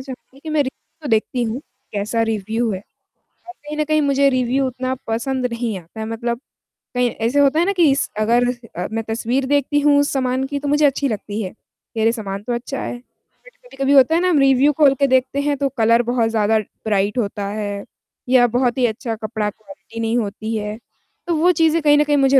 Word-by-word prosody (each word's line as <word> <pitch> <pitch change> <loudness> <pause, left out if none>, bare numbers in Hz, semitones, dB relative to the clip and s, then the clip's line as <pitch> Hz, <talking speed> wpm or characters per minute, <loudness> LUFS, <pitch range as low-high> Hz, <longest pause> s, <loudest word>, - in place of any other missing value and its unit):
चाहूँगी 265 +1 -11
कि 320 - -8
मैं 305 -1 +2
रिव्यू 290 +3 -10
तो - - -3
देखती 225 +3 +1
हूँ, 235 +4 -2 0.3
कैसा 210 +3 -1
रिव्यू 225 +1 -1
है, 185 - -4 0.7
और - - -7
कहीं 300 0 -5
न 305 - +2
कहीं 310 0 +2
मुझे 280 -1 +3
रिव्यू 255 +1 +1
उतना 255 0 -3
पसंद 250 +3 -1
नहीं 230 -4 -2
आता 180 +6 -12
है, 220 - -3
मतलब 235 +2 -3 0.6
कहीं 245 -1 +2
ऐसे 235 +6 0
होता 285 +2 +4
है 345 - +3
ना 400 - +2
कि 330 -7 +4
स - - -1
अगर 235 +3 +3 0.3
अ, 180 +2 -3
मैं 225 0 -2
तस्वीर 235 +4 -1
देखती 290 +1 +1
हूँ, 290 0 +4
उस 285 - +1
सामान 260 -1 0
की, 285 +1 -3
तो 285 - -5
मुझे 295 +1 +3
अच्छी 280 0 +2
लगती 210 -1 -4
है, 190 - -3
कि, 225 0 -10
"अरे! 225 - +4
सामान 205 -3 -5
तो 240 - -2
अच्छा 245 +3 -4
है।" - - -4 0.5
बट - - -15
कभी-कभी 285 - -2
होता 275 +4 +6
है 345 - +2
ना, 365 - +2
हम 315 - +3
रिव्यू 275 +1 +4
खोल 285 -3 +6
के 280 - +4
देखते 260 +1 +1
हैं, 290 0 0
तो 275 0 0
कलर 230 +1 +4
बहुत 235 -2 +1
ज़्यादा 220 0 +2
ब्राइट 205 0 -2
होता 205 -3 -2
है, 205 -1 -4 0.5
या 250 -1 +6
बहुत 245 +1 0
ही 250 - +3
अच्छा 225 0 -2
कपड़ा 215 -1 -3
क्वालिटी 230 +2 -12
नहीं 225 +1 0
होती 220 0 -3
है, 210 0 -3 0.5
तो 340 - +1
वो 345 +4 +4
चीज़ें 325 0 +3
कहीं 295 -1 +5
न 295 - +5
कहीं 295 -1 +1
मुझे 270 -1 +5
250 Hz, 220 wpm, -20 LUFS, 220-280 Hz, 0.7 s, होता